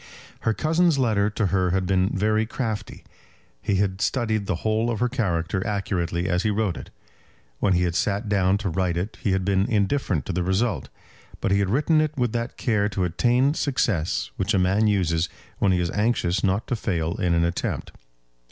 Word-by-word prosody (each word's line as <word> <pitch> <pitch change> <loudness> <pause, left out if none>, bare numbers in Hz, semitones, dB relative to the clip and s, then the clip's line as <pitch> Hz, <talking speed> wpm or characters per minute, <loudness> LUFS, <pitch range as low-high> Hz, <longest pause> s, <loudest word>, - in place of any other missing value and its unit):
Her 115 - 0
cousin's 165 0 +2
letter 110 -6 +2
to 105 0 -1
her 90 -2 +2
had 95 +1 0
been 95 0 +2
very 110 +2 +1
crafty. 110 -3 -4 0.6
He 100 - 0
had 95 0 0
studied 110 -5 0
the 90 -1 -3
whole 110 +2 +1
of 115 - -2
her 125 - +2
character 95 -6 -1
accurately 90 -4 -1
as 90 -1 +1
he 110 - 0
wrote 105 -4 0
it. - - -9 0.7
When 95 - +2
he 90 0 +2
had 85 -1 0
sat 100 +6 0
down 100 -1 +2
to 100 -2 -3
write 90 0 0
it 95 +5 -4
he 100 - +1
had 95 -1 0
been 100 +1 +2
indifferent 100 - 0
to 95 - -3
the 90 - 0
result; 95 - 0 0.5
but - - -1
he 100 - +3
had 100 -2 +1
written 150 - +3
it 155 -1 -2
with 125 -3 +1
that 115 +1 -3
care 105 -4 +1
to 95 -2 -2
attain 120 - +2
success 115 - 0
which 100 +3 0
a - - +3
man 95 +4 +3
uses 85 -5 +1 0.3
when 100 - +3
he 90 - +2
is 85 -1 -1
anxious 105 -4 0
not 100 +3 +1
to 125 - -1
fail 85 -6 -1
in 85 -2 +1
an 85 - +2
attempt. 85 0 -3
100 Hz, 200 wpm, -24 LUFS, 90-110 Hz, 0.7 s, he